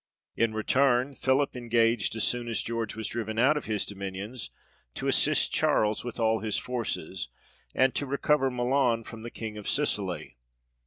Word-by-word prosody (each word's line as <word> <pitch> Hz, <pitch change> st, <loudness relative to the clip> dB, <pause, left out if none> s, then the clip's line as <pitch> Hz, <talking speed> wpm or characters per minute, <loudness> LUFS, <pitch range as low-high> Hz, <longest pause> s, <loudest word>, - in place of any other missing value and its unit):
In 115 Hz, -1 st, +1 dB
return, 130 Hz, +4 st, +2 dB
Philip 135 Hz, +1 st, +1 dB
engaged 115 Hz, -3 st, +1 dB
as 110 Hz, -, 0 dB
soon 120 Hz, -1 st, +1 dB
as 115 Hz, -, -1 dB
George 115 Hz, -1 st, -3 dB
was 110 Hz, -1 st, -4 dB
driven 110 Hz, -2 st, -4 dB
out 135 Hz, +6 st, +5 dB
of 150 Hz, -, -3 dB
his 105 Hz, -2 st, 0 dB
dominions, 100 Hz, +4 st, -6 dB, 0.5 s
to -, -, -3 dB
assist -, -, +3 dB
Charles 105 Hz, 0 st, +2 dB
with 120 Hz, 0 st, -6 dB
all 110 Hz, -1 st, +2 dB
his 110 Hz, -1 st, -1 dB
forces, 110 Hz, -7 st, -3 dB, 0.5 s
and 130 Hz, 0 st, +4 dB
to 145 Hz, -, -2 dB
recover 140 Hz, 0 st, +2 dB
Milan 125 Hz, -1 st, +1 dB
from 115 Hz, 0 st, -9 dB
the 120 Hz, -, -6 dB
King 110 Hz, -2 st, -6 dB
of 105 Hz, -, -4 dB
Sicily. 100 Hz, -, -1 dB
115 Hz, 165 wpm, -28 LUFS, 110-130 Hz, 0.5 s, out